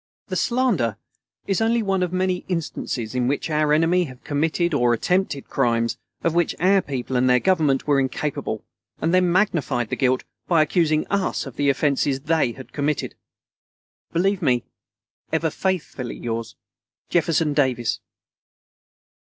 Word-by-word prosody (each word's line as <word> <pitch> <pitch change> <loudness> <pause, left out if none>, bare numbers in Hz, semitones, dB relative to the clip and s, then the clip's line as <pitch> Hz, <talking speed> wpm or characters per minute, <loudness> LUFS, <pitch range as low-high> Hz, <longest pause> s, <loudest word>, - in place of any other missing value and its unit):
The - - -2
slander 225 - +1 0.5
is 195 +1 0
only 230 +1 +2
one 195 -2 0
of 180 -1 0
many 185 0 +1
instances 145 - -3
in 125 -1 0
which 145 +4 -1
our 150 0 +2
enemy 165 +4 +3
have 130 -3 -12
committed 160 +3 0
or 120 -4 +3
attempted 180 - 0
crimes 115 -3 +1 0.3
of 165 - +1
which 175 -1 +1
our 190 +3 +4
people 130 -3 -4
and 125 +1 +3
their 125 0 +5
Government 155 -7 +2
were 145 -2 +3
incapable, 135 +2 -2 0.4
and 165 +2 0
then 180 -1 +4
magnified 145 - +1
the - - +1
guilt 130 -1 +1 0.2
by 165 -3 +4
accusing 155 0 +1
us 200 -5 0
of 135 -3 -9
the 145 -1 +1
offences 140 -1 +1
they 150 -5 +1
had 130 +1 -12
committed.... 145 0 -1 1.0
Believe 195 +3 +1
me, 125 -6 +2 0.7
ever 160 0 +1
faithfully 175 -9 -2
yours, 115 -1 -4 0.6
JEFFERSON 165 -2 +2
DAVIS. 125 -5 +1
150 Hz, 145 wpm, -23 LUFS, 130-180 Hz, 1.0 s, their